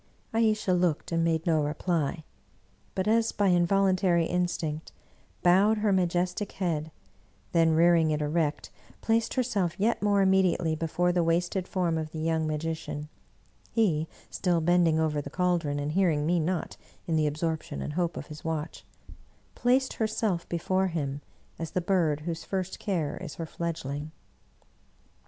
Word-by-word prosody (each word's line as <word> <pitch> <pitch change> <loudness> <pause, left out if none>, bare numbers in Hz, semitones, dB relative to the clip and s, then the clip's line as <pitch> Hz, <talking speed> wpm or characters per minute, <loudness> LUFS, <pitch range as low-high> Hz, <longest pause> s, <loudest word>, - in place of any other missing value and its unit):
" - - -37
Ayesha 215 -4 +2
looked 175 -3 0
and 165 0 +1
made 165 -1 +1
no 160 -3 +2
reply, 160 +1 -1 0.7
but, 190 +1 -1
as 225 +1 +3
by 200 -2 +2
involun 185 +2 +3
tary 175 -3 +2
instinct, 165 -3 -2 0.5
bowed 195 +5 +5
her 210 -1 +2
majestic 180 +2 0
head, 160 -5 -2 0.6
then 165 -2 +4
rearing 165 -1 +5
it 150 -1 0
erect, 150 0 -1 0.3
placed 225 0 +1
herself 205 -9 0
yet 225 +4 +1
more 200 -1 +3
immediately 185 -4 +3
before 165 +3 0
the 175 -1 +1
wasted 175 +3 0
form 170 -3 0
of 155 -1 -5
the - - -5
young 160 0 0
magician 155 -1 -4 0.6
(he 165 -9 +1 0.2
still 175 -3 +1
bending 165 -1 +3
over 155 -2 0
the 140 - -8
caldron, 175 -3 0
and 145 +1 -2
hearing 160 -4 +2
me 175 +2 +2
not 170 +2 -2 0.3
in 165 - 0
the 155 -1 +2
absorption 160 +2 -3
and 150 - -4
hope 175 0 -1
of - - -5
his 150 -1 -10
watch) 160 -1 -4 0.4
— - - -27 0.3
placed 260 +2 +2
herself 215 -5 -1
before 185 +3 0
him, 145 -5 -3 0.4
as 165 -1 -4
the - - -1
bird 170 -5 +1
whose 165 0 -4
first 190 -1 -3
care 165 -7 -2
is 140 - -7
her 165 - -4
fledgling. 155 -3 -4
170 Hz, 155 wpm, -28 LUFS, 155-185 Hz, 0.7 s, bowed